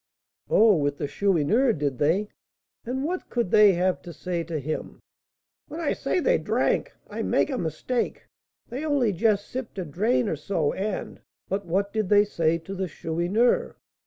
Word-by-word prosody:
"Oh, 215 Hz, -4 st, +5 dB
with 145 Hz, -1 st, 0 dB
the -, -, -2 dB
Chourineur, 200 Hz, -, +2 dB
did 140 Hz, -, -2 dB
they? 180 Hz, +8 st, +2 dB, 0.6 s
And 260 Hz, +2 st, -2 dB
what 360 Hz, +5 st, -3 dB
could 235 Hz, -7 st, -1 dB
they 210 Hz, -2 st, +7 dB
have 180 Hz, +1 st, 0 dB
to 175 Hz, -, -9 dB
say 175 Hz, 0 st, -3 dB
to 165 Hz, -1 st, -3 dB
him?" 155 Hz, +2 st, -5 dB, 0.7 s
"When 315 Hz, +2 st, -7 dB
I 325 Hz, -, 0 dB
say -, -, -1 dB
they -, -, +2 dB
drank, -, -, 0 dB, 0.2 s
I -, -, -5 dB
make -, -, +1 dB
a 260 Hz, -, -1 dB
mistake; 235 Hz, +9 st, -2 dB, 0.4 s
they 260 Hz, +5 st, -5 dB
only 280 Hz, -8 st, +1 dB
just 205 Hz, +1 st, +1 dB
sipped 250 Hz, -5 st, -6 dB
a 185 Hz, -, -3 dB
drain 215 Hz, -, +1 dB
or 160 Hz, -, 0 dB
so, 155 Hz, 0 st, -1 dB
and 200 Hz, 0 st, -4 dB
" -, -, -48 dB
"But 195 Hz, 0 st, -2 dB
what 195 Hz, +4 st, 0 dB
did 215 Hz, -4 st, -1 dB
they 205 Hz, 0 st, +6 dB
say 165 Hz, -5 st, +1 dB
to 170 Hz, +4 st, -8 dB
the 190 Hz, -1 st, -2 dB
Chourineur?" 175 Hz, +9 st, 0 dB
200 Hz, 180 wpm, -25 LUFS, 165-235 Hz, 0.7 s, they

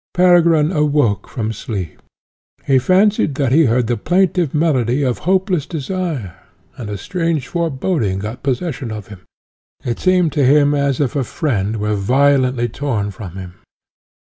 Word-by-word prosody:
Peregrine 170 Hz, -3 st, +4 dB
awoke 145 Hz, -, +1 dB
from 110 Hz, -3 st, -3 dB
sleep. 100 Hz, -5 st, -6 dB, 0.6 s
He 135 Hz, -1 st, +3 dB
fancied 185 Hz, -1 st, +2 dB
that 135 Hz, -3 st, 0 dB
he 160 Hz, +4 st, +5 dB
heard 120 Hz, 0 st, +2 dB
the 120 Hz, +1 st, -1 dB
plaintive 180 Hz, -4 st, +1 dB
melody 140 Hz, -4 st, +1 dB
of 125 Hz, -3 st, -1 dB
hopeless 185 Hz, -5 st, +1 dB
desire, 160 Hz, -, -4 dB, 0.4 s
and 115 Hz, -4 st, -7 dB
a 105 Hz, -, -4 dB
strange 165 Hz, -, -2 dB
foreboding 155 Hz, -, -1 dB
got 105 Hz, +5 st, -6 dB
possession 135 Hz, -1 st, -3 dB
of 105 Hz, -3 st, -7 dB
him. 105 Hz, -3 st, -10 dB, 0.7 s
It 120 Hz, -1 st, -2 dB
seemed 180 Hz, -3 st, +2 dB
to 145 Hz, -, +1 dB
him 145 Hz, +2 st, +4 dB
as 140 Hz, -2 st, 0 dB
if 140 Hz, -2 st, -1 dB
a 140 Hz, -, +1 dB
friend 110 Hz, -, -2 dB
were 105 Hz, 0 st, -1 dB
violently 130 Hz, +3 st, +2 dB
torn 115 Hz, -5 st, -3 dB
from 95 Hz, -2 st, -9 dB
him. 95 Hz, -2 st, -8 dB
135 Hz, 150 wpm, -18 LUFS, 115-165 Hz, 0.7 s, he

